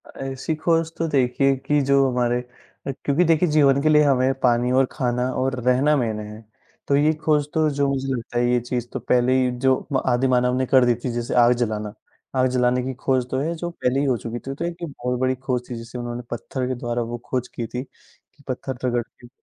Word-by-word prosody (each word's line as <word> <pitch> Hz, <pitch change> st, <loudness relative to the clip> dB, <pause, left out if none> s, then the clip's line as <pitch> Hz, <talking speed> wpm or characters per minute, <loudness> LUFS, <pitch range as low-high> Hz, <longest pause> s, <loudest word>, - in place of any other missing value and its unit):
अ, -, -, -18 dB
ऐसी 135 Hz, +3 st, -3 dB
खोज 165 Hz, +1 st, +1 dB
तो 165 Hz, -, -1 dB
देखिए 135 Hz, -1 st, +2 dB
कि 145 Hz, +1 st, +2 dB
जो 140 Hz, -1 st, +5 dB
हमारे 120 Hz, -1 st, +1 dB, 0.5 s
अ, -, -, 0 dB
क्योंकि 145 Hz, +5 st, +3 dB
देखिए 165 Hz, 0 st, +3 dB
जीवन 140 Hz, -2 st, +4 dB
के 155 Hz, -, +2 dB
लिए 150 Hz, 0 st, +6 dB
हमें 135 Hz, -2 st, +3 dB
पानी 120 Hz, 0 st, +3 dB
और -, -, +3 dB
खाना 125 Hz, -2 st, -1 dB
और 130 Hz, 0 st, -1 dB
रहना 130 Hz, +4 st, +3 dB
मेन 110 Hz, -5 st, -1 dB
हैं, 105 Hz, +1 st, -8 dB, 0.5 s
तो 140 Hz, -, +3 dB
ये 150 Hz, +2 st, +3 dB
खोज 150 Hz, -2 st, +2 dB
तो 155 Hz, -1 st, +2 dB
जो 140 Hz, -1 st, 0 dB
मुझे 135 Hz, 0 st, -2 dB
लगता 120 Hz, -1 st, -5 dB
है 120 Hz, 0 st, +2 dB
ये 125 Hz, -, +3 dB
चीज़ 120 Hz, 0 st, -3 dB
तो -, -, -2 dB
पहले 125 Hz, +1 st, +2 dB
ही 125 Hz, -1 st, +1 dB
जो 130 Hz, 0 st, +5 dB, 0.2 s
म 130 Hz, -, +2 dB
आदिमानव 125 Hz, 0 st, +2 dB
ने 130 Hz, -, +1 dB
कर 130 Hz, 0 st, +4 dB
दी 120 Hz, -1 st, +3 dB
थी, 120 Hz, +2 st, -4 dB
जैसे 120 Hz, 0 st, -3 dB
आग 120 Hz, +1 st, +5 dB
जलाना। 105 Hz, -2 st, -3 dB, 0.4 s
आग 130 Hz, 0 st, +3 dB
जलाने 125 Hz, 0 st, +2 dB
की 130 Hz, +1 st, -3 dB
खोज 130 Hz, -2 st, +1 dB
तो 130 Hz, -, 0 dB
है 160 Hz, +5 st, -1 dB
जो 175 Hz, +1 st, -4 dB
पहले 135 Hz, -6 st, -1 dB
ही 145 Hz, -, +1 dB
हो 130 Hz, -3 st, +1 dB
चुकी 115 Hz, +1 st, -6 dB
थी, 135 Hz, -, -6 dB
तो 170 Hz, -, -3 dB
एक 170 Hz, -1 st, -4 dB
बहुत 125 Hz, -5 st, -3 dB
बड़ी 130 Hz, 0 st, +1 dB
खोज 125 Hz, -1 st, -3 dB
थी, 125 Hz, -, -4 dB
जिसे 115 Hz, +2 st, -8 dB
उन्होंने 120 Hz, 0 st, -5 dB
पत्थर 125 Hz, +2 st, -3 dB
के 130 Hz, -, -2 dB
द्वारा 120 Hz, 0 st, -2 dB
वो -, -, -2 dB
खोज 125 Hz, -1 st, -2 dB
की 120 Hz, -2 st, -6 dB
थी, 125 Hz, +3 st, -5 dB
कि 140 Hz, +2 st, -27 dB
पत्थर 130 Hz, 0 st, -4 dB
रगड़ 120 Hz, -1 st, +1 dB
के 120 Hz, -, -19 dB
130 Hz, 235 wpm, -23 LUFS, 120-140 Hz, 0.5 s, लिए